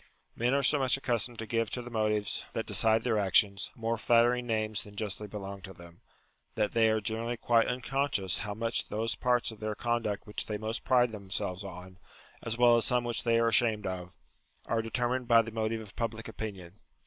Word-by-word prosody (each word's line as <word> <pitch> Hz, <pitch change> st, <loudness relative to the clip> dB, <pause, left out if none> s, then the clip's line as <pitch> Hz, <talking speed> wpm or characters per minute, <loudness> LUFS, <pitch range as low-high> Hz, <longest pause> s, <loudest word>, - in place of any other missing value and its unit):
Men 120 Hz, +3 st, +1 dB
are 140 Hz, -, +1 dB
so 145 Hz, +3 st, +4 dB
much 130 Hz, -1 st, +3 dB
accustomed 120 Hz, -3 st, 0 dB
to 115 Hz, -, -5 dB
give 115 Hz, 0 st, -1 dB
to 125 Hz, -, -4 dB
the 120 Hz, -, -9 dB
motives 105 Hz, -2 st, 0 dB
that -, -, -2 dB
decide 110 Hz, 0 st, +3 dB
their 115 Hz, -4 st, +1 dB
actions, 100 Hz, 0 st, +3 dB
more 115 Hz, 0 st, -2 dB
flattering 120 Hz, +1 st, +3 dB
names 110 Hz, -2 st, -1 dB
than 105 Hz, 0 st, -12 dB
justly 105 Hz, 0 st, -4 dB
belong 100 Hz, -1 st, -7 dB
to 95 Hz, +1 st, -9 dB
them, 85 Hz, -1 st, -15 dB, 0.5 s
that 105 Hz, -1 st, 0 dB
they 115 Hz, -1 st, +3 dB
are 110 Hz, 0 st, +2 dB
generally 115 Hz, +3 st, -3 dB
quite 115 Hz, 0 st, +3 dB
unconscious 125 Hz, -, -1 dB
how 105 Hz, -1 st, -4 dB
much 115 Hz, +1 st, -1 dB
those 110 Hz, +2 st, -1 dB
parts 125 Hz, -2 st, +1 dB
of 110 Hz, -, -12 dB
their 110 Hz, -1 st, -3 dB
conduct 120 Hz, -4 st, -2 dB
which 105 Hz, -, -3 dB
they 105 Hz, -, -2 dB
most 110 Hz, +2 st, -4 dB
pride 125 Hz, -2 st, +3 dB
themselves 100 Hz, -2 st, -4 dB
on 90 Hz, -1 st, -10 dB, 0.4 s
(as 115 Hz, 0 st, -2 dB
well 120 Hz, -1 st, +6 dB
as 115 Hz, -, +3 dB
some 125 Hz, -1 st, +3 dB
which 120 Hz, -1 st, -2 dB
they 115 Hz, -1 st, +2 dB
are 115 Hz, 0 st, +3 dB
ashamed 110 Hz, -2 st, +3 dB
of), 90 Hz, -1 st, -5 dB, 0.5 s
are 115 Hz, 0 st, 0 dB
determined 120 Hz, +2 st, -2 dB
by 115 Hz, -1 st, +6 dB
the 115 Hz, -, -7 dB
motive 110 Hz, 0 st, -2 dB
of 105 Hz, -2 st, -12 dB
public 115 Hz, -1 st, -3 dB
opinion. 100 Hz, -4 st, -7 dB
110 Hz, 205 wpm, -30 LUFS, 105-120 Hz, 0.5 s, well